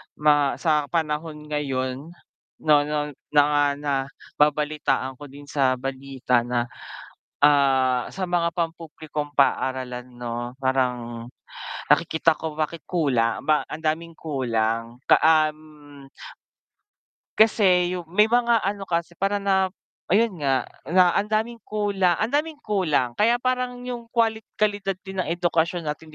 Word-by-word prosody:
ma 145 -2 +3
sa 150 -3 +1
panahon 150 -1 -2
ngayon, 135 -1 -2 0.6
no 155 -1 +5
no 150 0 -2 0.2
na 145 -1 +4
nababalitaan 145 -1 -1
ko 145 - -9
din 140 +1 -13
sa 135 -3 +2
balita 130 -2 -1
na, 120 -1 0 0.8
ah, 135 -4 +3
sa 185 -1 -4
mga 175 -1 +1
pampublikong 160 -3 -4
paaralan, 130 -2 0
'no, 120 0 -5
parang 125 -3 -1 0.6
nakikita 160 +1 +3
ko 160 -2 -5
bakit 160 +1 -2
kula 135 -10 0
ba 155 +1 +3
ang 160 +1 -8
daming 165 +1 -2
kulang 115 -6 -2
ka - - +5
um 155 -3 0 1.3
kasi 185 -5 +4
yung, 175 -3 -5
may 200 +5 +4
mga 235 0 +2
ano 195 0 -3
kasi 170 0 -1
para 195 +4 -1
na 195 -1 +1 0.4
ayun 200 -2 +2
nga, 135 -2 +1 0.2
na 180 0 +5
ang 205 +1 -1
daming 220 +2 -1
kula 200 -4 +1
ang 220 +6 -1
daming 305 +3 0
kulang 165 - 0
kaya 230 +3 +4
parang 250 -1 -1
yung 245 -2 -6
qualit 225 -2 0
kalidad 205 -2 0
din 190 -1 -8
ng 185 - 0
edukasyon 175 0 0
natin 155 0 -6
155 Hz, 130 wpm, -24 LUFS, 135-190 Hz, 1.3 s, no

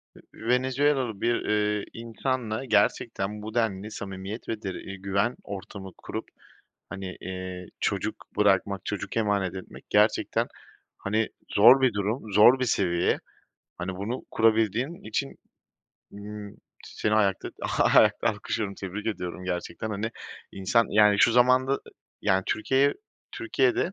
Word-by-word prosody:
I - - -15 0.2
ııı, 110 - -7
Venezuelalı 130 -3 +1
bir, 120 0 +2
ııı, 105 -1 +1
insanla 115 0 -3
gerçekten 105 -3 +1
bu 110 +1 -7
denli 110 -3 -1
samimiyet 100 +2 -6
ve 110 -1 -3
de 95 - -3 0.2
güven 100 +5 0
ortamı 95 -1 -8
kurup, - - -6 0.6
hani, 95 -1 -6
eee, 95 -1 -6
çocuk - - -1 0.2
bırakmak, 100 -1 +2
çocuk 105 +1 -4
emanet 100 -4 +1
etmek 95 - -10
gerçekten, 105 +1 +2 0.5
hani, 110 +2 0 0.2
zor 125 +6 +7
bir 130 -3 +4
durum, 105 +2 -2
zor 120 +6 +7
bir 130 - +1
seviye. 90 -6 +1 0.6
Hani, 90 +1 -4
bunu 110 +6 -4
kurabildiğin 115 - +1
için, 140 - -2 0.8
ımm, 105 0 -8 0.3
seni 105 - -1
ayakta 100 -3 +1 0.3
ayakta - - +5
alkışlıyorum, 105 -1 -2
tebrik 100 +3 -6
ediyorum 90 -4 -4
gerçekten, 90 +3 -4
hani, 105 +2 -2 0.4
insan 110 +5 +2
yani 105 -1 +5
şu 115 - +5
zamanda, 130 +3 +4 0.4
yani 95 -2 +3
Türkiye'ye 135 +5 +2 0.4
Türkiye'de 390 +2 +1
105 Hz, 125 wpm, -27 LUFS, 100-120 Hz, 0.8 s, zor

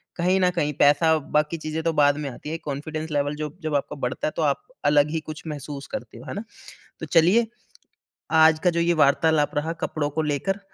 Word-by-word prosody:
कहीं 180 +2 +2
न 180 -1 +4
कहीं 150 -3 0
पैसा 160 +3 +5 0.2
बाकी 150 +2 +2
चीज़ें 155 +1 -4
तो 165 - +1
बाद 145 0 +4
में 140 - -3
आती 140 +4 -9
हैं 160 - -3
एक 165 - -9
कॉन्फिडेंस 155 +3 -4
लेवल 145 0 0
जो 150 +1 -5
जब 155 -2 -2
आपका 140 - -2
बढ़ता 125 +3 -2
है - - -2
तो - - -2
आप 145 -2 +1 0.2
अलग 145 0 +4
ही 160 - -1
कुछ 155 0 -9
महसूस 145 -2 -6
करते 270 - -6
हो। - - -12
है - - -5
ना? 205 - -5 0.6
तो - - -5
चलिए, 185 +8 +4 0.8
आज 160 0 +5
का 180 - +5
जो 170 0 -1
ये 170 +1 +2
वार्तालाप 150 +1 +2
रहा 160 +3 -1
कपड़ों 145 -2 -1
को 160 +2 -2
लेकर 155 +7 -1
155 Hz, 225 wpm, -24 LUFS, 145-165 Hz, 0.8 s, पैसा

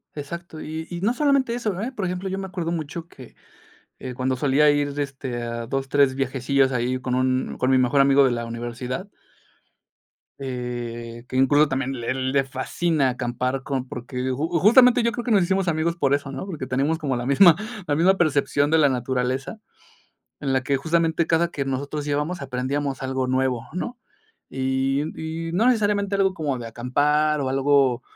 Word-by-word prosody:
Exacto 160 +2 -7
y 160 +1 -5
y 175 0 -5
no 215 +5 +2
solamente 275 -4 +2
eso, 215 -6 -2
eh, 240 +5 -3
por 210 -7 -4
ejemplo, 180 +2 -3
yo 190 - -3
me 195 - -4
acuerdo 175 -3 -4
mucho 165 0 -5
que, 130 -7 -14 0.6
eh, 130 -1 -6
cuando 130 0 0
solía 145 +3 +3
ir 145 -1 +1
de 145 0 -1
este, 135 -3 -5
a 115 0 -4
dos, 135 +3 -3
tres 140 -1 +3
viajecillos 135 0 +1
ahí 125 +1 -1
con 125 -1 -2
un 130 0 0
con 130 - +1
mi 130 - +5
mejor 130 +2 +3
amigo 135 0 +5
de 130 - +2
la 120 -1 -2
universidad. 120 - -5 1.3
Eh, 120 -2 -5
que 130 - -7
incluso 145 +3 +4
también 135 -1 -2
le 115 0 -2
le 130 +1 +1
fascina 135 +2 0
acampar 125 +1 -2
con 130 -1 -3
porque 125 +1 -4
just 150 +6 -2
justamente 245 +3 +6
yo 235 - +2
creo 240 +1 -4
que 245 - -4
nos 200 -4 +5
hicimos 190 +1 0
amigos 165 0 0
por 140 -4 +2
eso, 145 -1 -5
¿no?, 135 +7 -5
porque 160 -8 -5
tenemos 135 +5 0
como 145 -5 -2
la 120 0 -3
misma 160 +5 +7 0.3
la 145 - +1
misma 185 +5 +4
percepción 145 -3 +1
de 160 - +4
la 145 -2 +5
naturaleza, 130 - -2 0.8
en 135 -2 -1
la 130 - +1
que 140 +1 +1
justamente 165 +2 +1
cada 165 +1 +2
que 140 -5 -4
nosotros 140 +2 -3
íbamos, 150 +5 -1
aprendíamos 135 +1 -3
algo 130 0 -1
nuevo, 130 -2 0
¿no?, 240 +7 -4 0.5
y 130 +1 0 0.5
y - - -5
no 205 +7 +2
necesariamente 205 -4 +2
algo 195 -1 +2
como 150 -7 -2
de 120 - -7
acampar 145 +6 +1
o 130 - -1
algo, 135 -2 +2
140 Hz, 190 wpm, -23 LUFS, 130-165 Hz, 1.3 s, misma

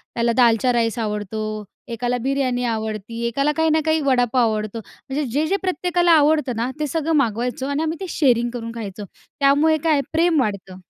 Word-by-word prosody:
त्याला 235 0 +1
दालचा 240 0 +4
राईस 230 0 0
आवडतो, 215 0 -3 0.2
एकाला 245 +1 -2
बिर्याणी 255 0 -1
आवडते, 220 0 -4
एकाला 275 +5 +1
काही 320 0 +2
ना 315 +1 +3
काही 315 0 +2
वडापाव 245 -3 +2
आवडतो. 215 +1 -3 0.3
म्हणजे 285 +3 -1
जे-जे 310 +8 +1
प्रत्येकाला 355 -1 +1
आवडतं 300 -5 +3
ना 235 +2 -1
ते 300 - -1
सगळं 325 +2 -1
मागवायचो 245 -1 0
आणि 285 +2 -1
आम्ही 320 +1 -2
ते 380 - -3
शेअरिंग 240 -7 +2
करून 230 -1 -5
खायचो. 210 -2 -6 0.3
त्यामुळे 290 +3 +4
काय 325 - +2
आहे 280 - +2
प्रेम 330 -1 +3
वाढतं. 200 -5 -4
250 Hz, 175 wpm, -21 LUFS, 225-300 Hz, 0.3 s, दालचा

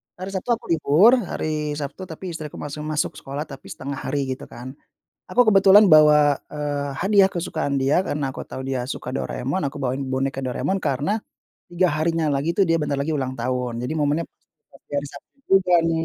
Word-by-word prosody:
hari 185 +2 -7
Sabtu 215 +5 0
aku 220 - -8
libur, 170 - +5
hari 155 -6 -3
Sabtu 150 +6 -6
tapi 175 +3 -7
istriku 155 -2 -7
masih 145 +1 -6
masuk 150 0 -1
sekolah 140 +2 -5
tapi 135 -3 -12
1/2 140 0 -6
hari, 140 +1 0
gitu 130 - -6
kan. 125 +2 -9 0.6
Aku 245 - +4
kebetulan 195 +1 +7
bawa, 150 -2 +6
eee, 145 -2 -3
hadiah 200 -1 +5
kesukaan 165 -5 -3
dia 140 +7 +2
karena 145 -2 -2
aku - - -8
tahu 130 - -7
dia 130 -2 -3
suka 130 - -5
Doraemon, 135 +3 -3
aku 140 0 -6
bawain 130 +2 -2
boneka 135 +1 -2
Doraemon, 190 +9 -1
karena 165 - -1 0.5
3 175 +1 +1
harinya 155 +1 0
lagi 145 +4 0
tuh 195 - +3
dia 165 -3 +2
bentar 150 -2 -1
lagi 145 - -1
ulang 130 -4 -2
tahun, 125 -1 -3
jadi 125 - -3
momennya 150 +2 +1 0.5
pas - - -19
di - - -22
hari 145 0 -1
Sabtu 140 - -14 0.3
juga 180 -2 +1
nih, 165 0 0
150 Hz, 190 wpm, -23 LUFS, 135-170 Hz, 0.6 s, kebetulan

